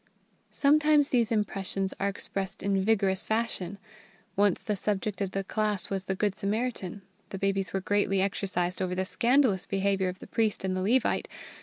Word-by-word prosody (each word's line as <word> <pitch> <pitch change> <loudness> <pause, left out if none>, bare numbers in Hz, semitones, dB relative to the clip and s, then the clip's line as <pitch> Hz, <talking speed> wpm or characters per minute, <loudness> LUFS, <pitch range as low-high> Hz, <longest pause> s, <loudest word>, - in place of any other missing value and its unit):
Sometimes 295 0 +4
these 235 -3 +2
impressions 195 -2 -1
are 200 - +1
expressed 195 -1 -4
in 195 -1 +1
vigorous 195 -3 +2
fashion. 220 -4 -2 0.6
Once 200 -2 +3
the 210 - -1
subject 200 0 -2
of 195 - 0
the 195 +1 -2
class 210 -1 -1
was 195 -1 -2
the 190 - -1
Good 205 0 +1
Samaritan. 205 -2 -3 0.3
The 195 - -5
babies 195 0 0
were 195 - -1
greatly 200 0 +1
exercised 185 -2 0
over 180 -1 -1
the 185 +1 -1
scandalous 235 -2 +2
behaviour 195 -1 +1
of 180 - -6
the - - -11
priest 220 -3 0
and 185 -1 -1
the 185 - -1
Levite. 230 +6 +2
195 Hz, 170 wpm, -28 LUFS, 190-215 Hz, 0.6 s, Sometimes